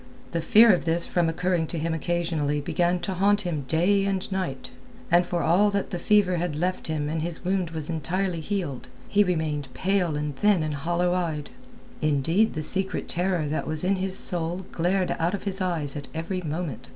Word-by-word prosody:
The 170 - -2
fear 225 +4 +6
of 175 - -1
this 170 +1 +3
from 175 -2 0
occurring 170 0 -1
to 170 - -5
him 160 +1 -2
occasionally 160 -3 -1
began 175 +4 0
to 190 +2 -3
haunt 200 +3 +2
him 160 -7 -4
day 185 +6 +2
and 195 -1 -2
night, 185 -9 -4 0.4
and 175 +1 +4
for 175 -1 -2
all 190 +6 +3
that 200 -1 -3
the 175 - -3
fever 190 -1 +2
had 170 -3 -3
left 180 +4 -2
him 155 -2 -2
and 155 +1 -3
his 170 +1 -5
wound 185 -2 -1
was 160 -2 -5
entirely 175 +1 -2
healed, 165 -9 -4 0.2
he 205 0 +3
remained 155 -7 -2
pale 185 -4 0
and 150 -1 -4
thin 200 +1 +2
and 155 -1 -3
hollow 175 +5 -1
eyed. 160 -5 -3 0.5
Indeed 155 +8 +1
the 155 - -2
secret 190 +4 -1
terror 180 -2 -1
that 155 - -3
was 155 +1 +2
in 190 +1 +1
his 190 0 +1
soul 175 +1 +7
glared 180 +2 0
out 170 +4 0
of - - -8
his 195 -1 -2
eyes 165 -6 0
at 145 -2 -7
every 175 +3 -4
moment. 155 -6 -5
175 Hz, 200 wpm, -25 LUFS, 155-185 Hz, 0.5 s, soul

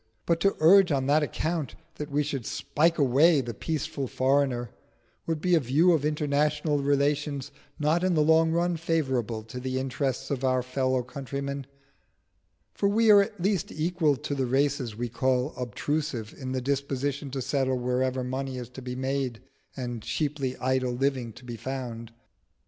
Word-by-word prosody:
But 170 -1 +2
to 195 +3 +2
urge 180 +3 +6
on 135 -2 +1
that 145 +3 +4
account 155 0 -2 0.2
that 150 0 -5
we 145 +1 +1
should 140 -5 -4
spike 165 +3 +1
away 145 +3 +5
the 120 -3 -3
peaceful 155 +2 -3
foreigner, 130 -2 +1 0.6
would 165 -2 -1
be 180 +1 +1
a 170 - +6
view 150 +7 +3
of 160 -4 +2
international 150 0 +1
relations 140 0 0 0.3
not 155 +3 +1
in 185 -2 +2
the 155 - +4
long 160 +1 +4
run 170 +1 +1
favourable 130 -9 -1
to 110 +3 -8
the 130 0 -3
interests 130 0 -2
of 135 -2 -2
our 130 -1 +2
fellow 130 0 0
countrymen; 140 +1 -5 1.1
for 200 - +1
we 220 +1 +4
are 205 -1 +8
at 200 0 -4
least 195 -3 0
equal 160 -1 +1
to 145 +2 -5
the 135 -2 -1
races 135 -3 0
we 120 +2 -3
call 130 +3 0
obtrusive 125 -1 -3
in 130 -2 -6
the 130 0 -1
disposition 140 +1 -2
to 135 +1 -4
settle 130 0 0
wherever 125 +1 0
money 130 +1 -3
is 125 -2 -6
to 125 +1 -10
be 125 0 -5
made 130 -2 -2 0.4
and 120 -3 -4
cheaply 140 -1 -2
idle 130 -1 0
living 130 -2 -1
to 125 +3 -14
be 120 -1 -6
found. 120 -3 -5
140 Hz, 170 wpm, -27 LUFS, 130-150 Hz, 1.1 s, are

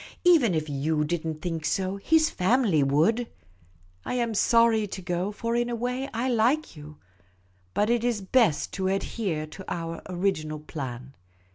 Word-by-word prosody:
Even 310 - +5
if 155 -1 0
yoji 150 +2 0
did 165 +1 -2
n't 155 -1 -5
think 165 -3 -3
so, 190 +3 -1
his 315 +9 +3
family 195 - +2
would. 165 - +2 0.8
I - - -3
am 235 -2 0
sorry 225 0 +3
to 195 - -6
go; 180 +2 -2
for 230 +2 -3
in 240 0 0
a 240 - -2
way 250 +3 -3
I 235 +2 -2
like 250 - +1
you. 150 0 -11 0.8
But 210 +3 +2
it 240 -1 +1
is 240 -3 0
best 205 - +2
to 190 -1 -1
adhere 190 -4 -2
to 155 +5 -10
our 165 -1 -4
original 175 -5 -1
plan. 135 -4 -7
195 Hz, 165 wpm, -26 LUFS, 155-235 Hz, 0.8 s, Even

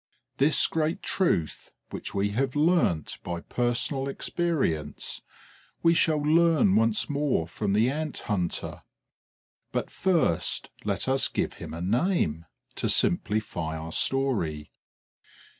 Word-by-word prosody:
This 145 +3 +5
great 160 0 -1
truth, 90 - -1 0.2
which - - -5
we 100 +1 +1
have 130 +5 -1
learnt 150 - +1
by 85 -1 -5
personal 125 - -1
experience, 135 - -2 0.6
we 165 - +5
shall 160 -2 +3
learn 155 - +3
once 110 0 +2
more 145 - 0
from 100 +3 -2
the 110 +3 +3
Ant 155 0 -3
hunter. 95 -6 -2 0.9
But - - -3
first 170 - +1
let - - -1
us 135 +1 +2
give - - -2
him - - -7
a 80 - -6
name, 95 - 0 0.3
to - - -1
simplify 90 -7 +1
our 80 +1 -7
story. 85 - 0
120 Hz, 120 wpm, -27 LUFS, -, 0.9 s, This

